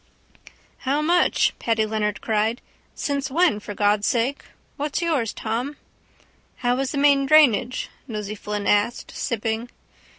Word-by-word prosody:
—How 280 +3 0
much? 350 +3 +3
Paddy 225 -2 +1
Leonard 210 -1 -2
cried. 220 +2 0 0.4
Since 280 -2 -2
when, 320 -5 +2
for 205 0 -8
God' 205 0 +2
sake? 245 +6 0 0.3
What's 295 0 -2
yours, 285 -10 0
Tom? 240 +7 -3 0.8
—How 245 +1 0
is 270 -1 -1
the 290 - -4
main 280 -1 +4
drainage? 255 -4 +4 0.2
Nosey 210 -3 -4
Flynn 210 -1 -4
asked, 205 +4 +1
sipping. 225 +1 -3
240 Hz, 130 wpm, -23 LUFS, 215-280 Hz, 0.8 s, main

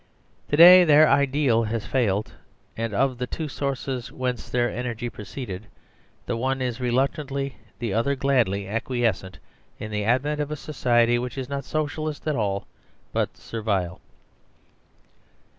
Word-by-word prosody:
To 145 - +1
day 180 +2 +10
their 155 -1 +6
ideal 135 -4 +2
has 110 -1 -3
failed, 105 -3 0 0.4
and 115 0 -3
of 130 +4 0
the 125 - -2
two 160 +4 -4
sources 135 -3 -3
whence 125 -2 -3
their 120 -1 +1
energy 120 -1 -4
proceeded, 105 -1 -7 0.6
the 120 - -2
one 130 +3 -1
is 125 -2 -2
reluctantly, 135 +2 -1 0.2
the 115 -3 -3
other 130 +6 +1
gladly, 120 -8 +1
acquiescent 110 -4 -1 0.4
in 110 - -7
the 105 0 -1
advent 135 +7 +1
of 145 - -3
a 150 - -3
society 120 -5 +2
which 125 +1 -5
is 130 -1 -4
not 140 0 -4
So 155 0 0
cialist 155 0 -5
at 155 -2 0
all 100 -4 -1 0.5
but - - -1
Servile. 100 -6 -3
125 Hz, 145 wpm, -24 LUFS, 115-140 Hz, 0.6 s, day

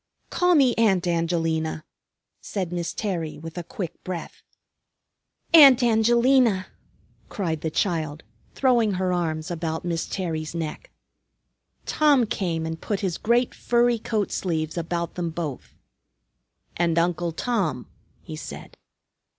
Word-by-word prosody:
"Call 360 0 +3
me 265 -5 +5
Aunt 195 -6 +3
Angelina," 165 -2 -1 0.6
said 185 -4 -4
Miss 170 -1 -2
Terry 175 -7 -3
with 165 +1 -9
a 175 - -3
quick 185 -3 -7
breath. 180 -2 -6 1.1
"Aunt 275 -6 +9
Angelina," 235 -2 +3 0.6
cried 165 -6 -3
the 160 - -1
child, 155 -3 -1 0.3
throwing 240 -6 +3
her 185 0 0
arms 160 -1 -2
about 160 -1 -3
Miss 170 -2 -2
Terry's 160 -4 -3
neck. 160 -2 -5 1.0
Tom 290 -5 +3
came 170 -6 -2
and 160 0 -5
put 205 -2 -2
his 185 -4 -2
great 240 +2 +2
furry 240 -1 +2
coat 215 -2 -2
sleeves 160 -4 -2
about 170 0 -3
them 175 -2 -3
both. 160 -5 -6 1.0
"And 170 -1 +1
Uncle 170 0 +1
Tom," 165 - -1 0.4
he - - -7
said. - - -9
175 Hz, 125 wpm, -24 LUFS, 165-225 Hz, 1.1 s, Aunt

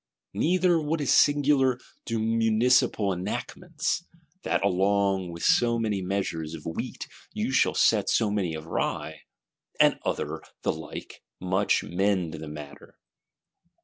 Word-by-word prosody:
Neither, 175 -1 +2
what 155 +2 -1
is 145 - +2
singular, 140 -3 +4 0.3
do 115 - -1
municipal 115 -1 +2
enactments, 150 - -3 0.4
"That - - 0
along 95 -1 +1
with 85 0 -8
so 120 -1 +3
many 110 -4 -1
measures 90 -4 -3
of 75 - -11
wheat 80 - -5 0.3
you - - -2
shall - - +2
sell - - +3
so 110 -3 +2
many 95 -6 -1
of 80 0 -7
rye," 80 - -3 0.6
and - - +4
other - - -3 0.2
the - - +1
like, 80 -1 -9 0.2
much 95 +2 +1
mend 90 -2 0
the 80 0 -7
matter. 75 -1 -10
100 Hz, 130 wpm, -27 LUFS, 90-125 Hz, 0.6 s, singular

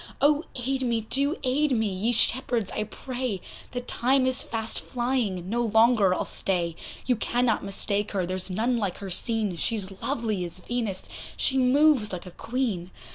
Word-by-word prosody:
Oh! 295 +2 +4
aid 265 +2 -1
me, 235 -3 +1
do 280 +8 +1
aid 275 +2 +2
me, 220 -2 +1
ye 195 +5 0
shepherds, 235 -2 +1
I 215 - -2
pray! 245 -1 -4 0.3
The 245 - -3
time 255 +2 +2
is 260 0 +1
fast 225 -1 -1
flying, 240 -8 -1
no 235 +4 0
longer 225 -3 +4
I'll - - -2
stay; 175 -3 -1 0.3
You 250 - +2
cannot 240 0 +1
mistake 200 +1 -1
her, 190 -3 0
there's 185 +1 -1
none 230 +6 0
like 200 -5 -2
her 195 -2 -6
seen, 215 0 +1
She's 200 +1 0
lovely 225 -8 -1
as 175 0 -6
Venus, 215 -1 -3 0.3
she 270 0 +3
moves 260 -3 +4
like 180 -1 -5
a 180 - -9
Queen. 225 -5 -2
230 Hz, 170 wpm, -26 LUFS, 195-255 Hz, 0.3 s, Oh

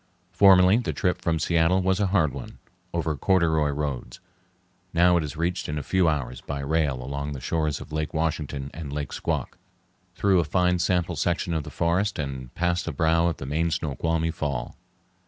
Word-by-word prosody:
Formerly 95 0 +6
the 120 - -2
trip 90 -2 -1
from 80 -1 +1
Seattle 85 +4 +2
was 95 +1 +1
a 100 - +2
hard 80 -8 +2
one, - - -8 0.3
over 80 -2 -1
corduroy 80 -2 +2
roads; 70 -4 -4 0.8
now 90 +1 +5
it 85 - 0
is 75 0 -6
reached 85 0 -1
in 75 - -2
a 75 - -3
few 95 -3 +2
hours 70 -5 -3
by 70 -1 -5
rail 70 -3 0
along 70 +2 -4
the 70 - -6
shores 75 +2 -1
of - - -11
Lake 75 0 -2
Washington 75 -4 -2
and 75 -3 -7
Lake 70 0 -4
Squak, - - -3 0.6
through 95 -3 +3
a - - +3
fine 90 +3 +1
sample 90 -1 +1
section 85 +1 -1
of 80 - 0
the - - -6
forest 90 +5 0
and 65 -4 -5
past 90 0 0
the 85 - -2
brow 80 +3 +2
of 85 - -1
the - - -7
main 80 +5 0
Snoqualmie 80 +1 -1
Fall. 70 -5 -3
80 Hz, 190 wpm, -25 LUFS, 75-90 Hz, 0.8 s, Formerly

